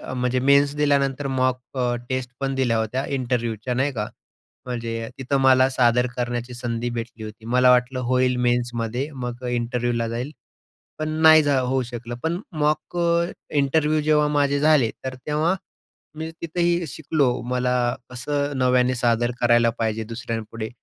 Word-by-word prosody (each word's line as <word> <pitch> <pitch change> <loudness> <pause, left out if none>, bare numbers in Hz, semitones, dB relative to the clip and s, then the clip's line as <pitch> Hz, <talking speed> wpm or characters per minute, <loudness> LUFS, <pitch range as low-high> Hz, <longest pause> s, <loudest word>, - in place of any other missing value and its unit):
म्हणजे 125 0 0
मेन्स 140 +2 +4
दिल्यानंतर 140 -1 +1
मॉक 130 -1 +1 0.2
अ, 125 -1 +1
टेस्ट 130 -1 -2
पण 135 -1 -1
दिल्या 125 -4 +1
होत्या 110 +5 -1
इंटरव्ह्यूच्या 125 -3 -2
नाही 135 +3 +1
का? 105 -3 -3 0.6
म्हणजे 115 -2 -4
तिथं 135 +1 0
मला 130 -1 +5
सादर 125 -1 +3
करण्याची 120 0 -3
संधी 120 0 -3
भेटली 115 -1 -6
होती. 110 +1 -10
मला 125 +2 +4
वाटलं 125 +1 +2
होईल 125 0 +2
मेन्समध्ये, 120 +2 -1
मग 125 -1 -5
इंटरव्ह्यूला 120 -1 -1
जाईल, 120 +5 -4 0.7
पण 155 0 -2
नाही 160 0 +8
जा 145 -2 +2
होऊ 130 +1 0
शकलं. 120 -1 -6
पण 170 +3 -1 0.2
मॉक 150 +3 0
अ, 170 0 +2 0.3
इंटरव्ह्यू 150 +2 +2
जेव्हा 150 0 +3
माझे 140 0 +2
झाले 150 -7 +4
तर 130 -1 -3
तेव्हा 155 +4 +1 0.6
मी 160 0 -4
तिथंही 170 0 0
शिकलो. 150 -4 0
मला 125 0 0 0.4
कसं 145 +3 -2
नव्याने 125 0 +3
सादर 120 -1 +1
करायला 120 -1 +4
पाहिजे 110 0 -1
दुसऱ्यांपुढे 115 -1 -5
125 Hz, 145 wpm, -23 LUFS, 120-140 Hz, 0.7 s, नाही